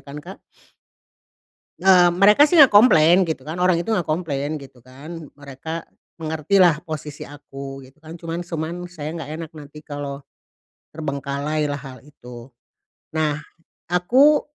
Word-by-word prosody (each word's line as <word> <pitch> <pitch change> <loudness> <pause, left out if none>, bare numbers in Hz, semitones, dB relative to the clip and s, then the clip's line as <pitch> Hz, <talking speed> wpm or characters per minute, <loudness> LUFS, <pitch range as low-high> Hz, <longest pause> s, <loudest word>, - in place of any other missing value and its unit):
kan, 140 +1 -11
Kak. - - -10 1.4
Eee, 185 -2 +6
mereka 205 +10 +6
sih 305 - -3
enggak 290 -6 +8
komplain 185 -5 +6
gitu 160 -5 -4
kan. 155 +5 -7
Orang 180 -1 +2
itu 175 - -7
enggak 195 -7 0
komplain 155 -2 -2
gitu 135 -2 -14
kan. 155 +6 -10
Mereka 145 +4 -7 0.4
mengertilah 160 +2 +3
posisi 150 -2 -7
aku 135 -1 -9
gitu 135 +2 -17
kan. 160 +1 -12
Cuman 170 +1 -6
cuman 165 -1 -4
saya 160 -4 -7
enggak 160 -3 -6
enak 160 0 -7
nanti 150 0 -12
kalau 145 -1 -6 0.7
terbengkalailah 145 0 -3
hal 135 -2 -10
itu. 125 -3 -13 0.6
Nah, 155 -2 0 0.5
aku 260 +12 +4
155 Hz, 135 wpm, -22 LUFS, 140-175 Hz, 1.4 s, enggak